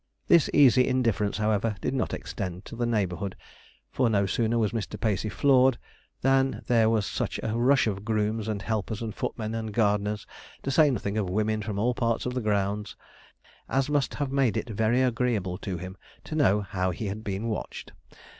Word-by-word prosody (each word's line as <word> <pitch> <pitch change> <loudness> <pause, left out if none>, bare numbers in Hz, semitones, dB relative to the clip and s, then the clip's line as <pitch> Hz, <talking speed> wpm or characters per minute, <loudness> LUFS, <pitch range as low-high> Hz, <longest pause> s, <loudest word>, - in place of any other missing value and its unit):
This 170 -3 +5
easy 130 -3 +5
indifference, 115 -5 +1
however, 110 0 +1
did - - -2
not 135 - -1
extend 95 -2 -5
to - - -9
the 120 0 -1
neighbourhood; 95 -4 -1 0.6
for 125 -3 +2
no 100 -2 +2
sooner 115 +4 0
was 110 -3 +1
Mr. 110 -4 -4
Pacey 110 -1 0
floored 130 0 +4 0.4
than 135 0 +2
there 115 -2 +3
was 110 -3 +1
such - - -3
a 110 0 -1
rush 130 +3 +4
of 100 -3 -2
grooms, 110 0 -1
and 105 -2 -3
helpers, 110 0 -2
and 110 -2 -4
footmen, 110 -1 -4
and 110 -2 -4
gardeners 105 -1 +1 0.4
to 135 - -1
say 150 +1 +5
nothing 110 -4 -1
of 95 -4 -1
women, 110 +3 0
from 105 -1 -4
all 120 +4 +1
parts 115 -1 -1
of 125 - -2
the 125 - -2
grounds, 105 -1 -1 0.7
as 135 +2 0
must 145 -2 +1
have 145 -2 -2
made 135 -6 +2
it - - -3
very 110 +4 +2
agreeable 115 -7 0
to 95 -3 -4
him 90 +2 -7 0.3
to - - -8
know 105 -10 +3
how 95 -2 -2
he 90 +5 -4
had 105 +2 -4
been 100 +2 -3
watched. 110 -4 -5
110 Hz, 190 wpm, -27 LUFS, 100-125 Hz, 0.7 s, This